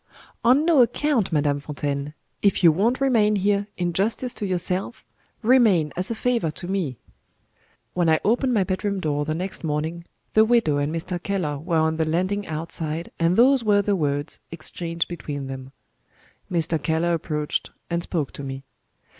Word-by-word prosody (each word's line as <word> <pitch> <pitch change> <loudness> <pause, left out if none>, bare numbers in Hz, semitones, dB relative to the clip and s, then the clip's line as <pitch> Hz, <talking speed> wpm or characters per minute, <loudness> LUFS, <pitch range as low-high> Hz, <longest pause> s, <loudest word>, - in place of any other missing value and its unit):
"On 260 +6 +5
no 325 -6 +5
account, 245 -4 +1
Madame 145 -2 +1
Fontaine. 145 0 -4 0.3
If 200 -1 +2
you 170 - +8
won't 220 +10 +1
remain 225 -6 +3
here, 200 +1 +1
in 175 -1 -1
justice 225 +7 0
to 205 - -4
yourself, 185 +4 -2 0.4
remain 215 - +4
as 180 +1 -2
a 230 - -2
favor 235 -7 0
to 175 +3 -7
me." 180 -10 -2 1.0
When 175 -2 +2
I 160 -1 +4
opened 245 +4 +2
my 215 -5 +3
bedroom 195 +1 -2
door 145 -4 -1
the 155 - -2
next 185 +3 -4
morning, 160 +2 -2 0.3
the 215 - +6
widow 220 -10 +3
and 145 +1 0
Mr. 170 +2 -3
Keller 175 -8 -2
were 165 +2 -1
on 160 0 +2
the 160 - +1
landing 185 +6 -1
outside, 160 0 -4
and 165 +2 +3
those 260 +1 +5
were 205 -2 +3
the 205 0 +1
words 145 -3 -1
exchanged 165 +1 -4
between 145 -5 -5
them. 135 0 -7 0.8
Mr. 165 -2 +1
Keller 165 +3 +1
approached, 150 -2 -2 0.2
and 170 0 -1
spoke 160 -5 -2
to - - -8
me. 135 0 -6
175 Hz, 170 wpm, -24 LUFS, 155-205 Hz, 1.0 s, you